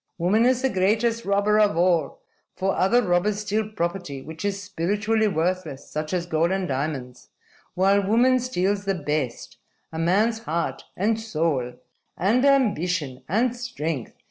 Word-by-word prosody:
"'Woman 200 +7 +3
is 255 0 +1
the 265 - +3
greatest 225 +4 +1
robber 200 +2 +2
of 205 -6 +3
all. 170 -4 +1 0.3
For 195 0 0
other 240 +7 +3
robbers 200 +3 +1
steal 210 +1 -1
property 175 -7 -3
which 160 0 -8
is 200 -1 -1
spiritually 205 +4 0
worthless, 170 -5 -2
such 155 0 -3
as 180 -2 -1
gold 165 0 +1
and 190 -1 -1
diamonds; 130 -3 -4 0.5
while 195 +2 +3
woman 250 +4 +4
steals 205 -5 -1
the 195 -1 0
best 150 -7 -3 0.4
a 160 - -4
man's 210 +7 +2
heart, 170 -7 -3
and 215 +4 +1
soul, 155 - -1 0.4
and 225 +8 +2
ambition, 180 - +1
and 235 +6 +1
strength.' 165 - -4
190 Hz, 145 wpm, -24 LUFS, 165-215 Hz, 0.5 s, woman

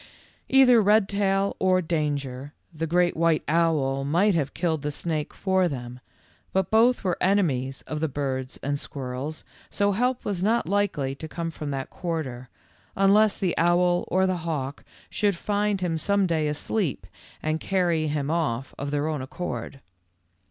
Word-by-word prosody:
Either 255 -3 +6
Redtail 200 -1 +2
or 185 -1 +3
Danger, 145 -5 -2 0.2
the 165 +1 -3
great 175 +2 +2
white 165 -1 +2
owl, 150 -4 +1
might 175 +9 +3
have 150 -5 -1
killed 160 -4 0
the 150 - -2
snake 155 0 -3
for 190 -1 +1
them, 125 -4 -6 0.5
but 190 -2 0
both 235 +3 +4
were 180 -3 -1
enemies 140 -10 +1
of 155 - -5
the 160 - 0
birds 130 -2 -3
and 145 +1 -1
squirrels, 135 +3 -5 0.3
so 205 0 +1
help 245 +5 0
was 195 -4 -2
not 220 -3 +2
likely 175 -9 0
to 160 +3 -8
come 165 +1 -4
from 150 -2 -6
that 135 -1 -4
quarter, 140 -8 -4 0.5
unless 200 +2 +4
the 185 -3 0
owl 175 +1 +3
or 190 +1 +2
the 185 -1 0
hawk 150 -5 -4 0.3
should 205 -2 +1
find 205 +2 -1
him 165 -3 -1
some 200 +3 +2
day 160 -4 0
asleep 150 - -2 0.4
and 155 +1 0
carry 170 -5 +1
him 145 -1 -1
off 135 -7 -1
of 140 - -3
their 145 +1 -1
own 155 -3 -2
accord. 130 -2 -5
165 Hz, 160 wpm, -25 LUFS, 145-190 Hz, 0.5 s, Either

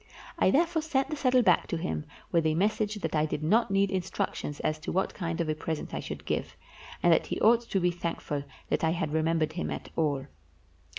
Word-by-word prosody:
I - - +5
therefore 330 +2 +2
sent 280 -3 0
the - - 0
saddle 255 -3 +3
back 180 -5 +4
to 170 - -2
him 165 -2 -3 0.3
with 165 -2 +3
a 155 - +1
message 210 +3 +1
that 165 -6 -3
I 155 0 +2
did 150 0 -3
not 220 +9 +3
need 195 0 +2
instructions 175 -5 -2
as 155 0 -1
to - - -4
what 190 +2 0
kind 165 -3 -3
of 170 - 0
a 155 - +1
present 155 0 -4
I - - -2
should - - -6
give, - - -2 0.5
and 175 - +6
that - - +2
he - - -2
ought 230 +2 +5
to 195 - +1
be 180 -1 +2
thankful 165 -4 -3 0.3
that - - 0
I 160 0 +3
had 160 -3 -2
remembered 160 0 +1
him 175 - -3
at - - -5
all. 145 -4 0
170 Hz, 225 wpm, -29 LUFS, 155-210 Hz, 0.5 s, and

